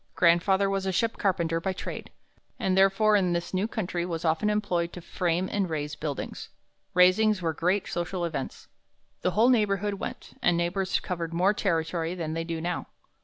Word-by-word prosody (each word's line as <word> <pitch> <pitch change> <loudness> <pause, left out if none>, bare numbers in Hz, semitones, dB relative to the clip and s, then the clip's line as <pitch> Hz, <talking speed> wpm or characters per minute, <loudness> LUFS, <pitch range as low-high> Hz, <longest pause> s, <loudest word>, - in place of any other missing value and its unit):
"Grandfather 185 +3 +4
was 195 0 -1
a - - +1
ship 225 +5 0
carpenter 170 -4 0
by 190 +2 -1
trade, 195 - -6 0.5
and 185 -1 0
therefore 195 +3 +4
in 185 -3 +2
this 170 +2 -3
new 190 +3 +1
country 180 -6 -2
was 170 -1 -4
often 160 +6 +2
employed 175 -5 0
to - - -8
frame 175 +1 -1
and 195 -3 0
raise 150 -2 -3
buildings. 150 -2 -5 0.5
Raisings 185 +3 +5
were 165 -3 -1
great 180 +5 0
social 175 +1 -2
events. 150 -5 -5 0.5
The - - +2
whole 230 +3 +6
neighborhood 205 -4 +2
went, - - -7
and 175 -1 +3
neighbors 185 +2 0
covered 170 -2 -4
more 185 +4 +3
territory 165 -3 -1
than 160 -3 -3
they 165 0 -2
do 165 -1 -4
now. 175 +2 -3
180 Hz, 175 wpm, -27 LUFS, 170-195 Hz, 0.5 s, whole